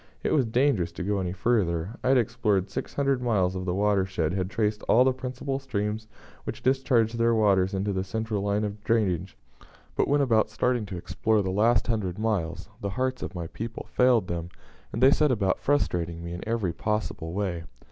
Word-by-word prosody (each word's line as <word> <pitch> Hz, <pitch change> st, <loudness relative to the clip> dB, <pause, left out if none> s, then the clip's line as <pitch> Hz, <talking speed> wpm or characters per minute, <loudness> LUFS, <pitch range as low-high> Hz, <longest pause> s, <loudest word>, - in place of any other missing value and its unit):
It -, -, +1 dB
was 135 Hz, -6 st, +3 dB
dangerous 110 Hz, -7 st, +2 dB
to 90 Hz, -, -5 dB
go 100 Hz, +1 st, 0 dB
any 90 Hz, -2 st, -2 dB
further. 95 Hz, -3 st, 0 dB
I -, -, 0 dB
had 135 Hz, 0 st, +5 dB
explored 105 Hz, -5 st, +1 dB
six -, -, -5 dB
hundred 140 Hz, -2 st, +1 dB
miles 100 Hz, -7 st, +1 dB
of 95 Hz, 0 st, -4 dB
the 90 Hz, -1 st, -1 dB
watershed, 95 Hz, -5 st, +1 dB
had 95 Hz, -1 st, -1 dB
traced 105 Hz, +1 st, -1 dB
all 125 Hz, -, +6 dB
the 130 Hz, 0 st, +3 dB
principal 130 Hz, +1 st, -4 dB
streams 110 Hz, -4 st, -3 dB, 0.4 s
which -, -, -6 dB
discharge 130 Hz, -4 st, +2 dB
their 115 Hz, 0 st, +2 dB
waters 100 Hz, -3 st, +3 dB
into 100 Hz, +1 st, -1 dB
the 95 Hz, 0 st, -1 dB
central 110 Hz, +1 st, -2 dB
line 100 Hz, +1 st, 0 dB
of 105 Hz, 0 st, -5 dB
drainage, 95 Hz, -6 st, 0 dB, 0.6 s
but -, -, +2 dB
when 145 Hz, +1 st, +3 dB
about 115 Hz, -5 st, +3 dB
starting 125 Hz, -4 st, 0 dB
to 95 Hz, -, -5 dB
explore 110 Hz, +4 st, 0 dB
the 95 Hz, -, -1 dB
last 110 Hz, +5 st, +3 dB
hundred 105 Hz, -6 st, -1 dB
miles 100 Hz, -6 st, -2 dB
the 100 Hz, -, -2 dB
hearts 130 Hz, +5 st, -2 dB
of -, -, -5 dB
my 85 Hz, -1 st, -4 dB
people 115 Hz, +7 st, -6 dB
failed 125 Hz, -6 st, +3 dB
them, 85 Hz, -1 st, -4 dB, 0.4 s
and 115 Hz, -, -1 dB
they 135 Hz, -, +8 dB
set 150 Hz, -1 st, +3 dB
about 100 Hz, -6 st, +1 dB
frustrating 85 Hz, -, 0 dB
me 85 Hz, 0 st, -5 dB
in 85 Hz, -, -6 dB
every 110 Hz, -7 st, 0 dB
possible 105 Hz, -6 st, -3 dB
way. 90 Hz, -4 st, -2 dB
105 Hz, 200 wpm, -27 LUFS, 95-120 Hz, 0.6 s, they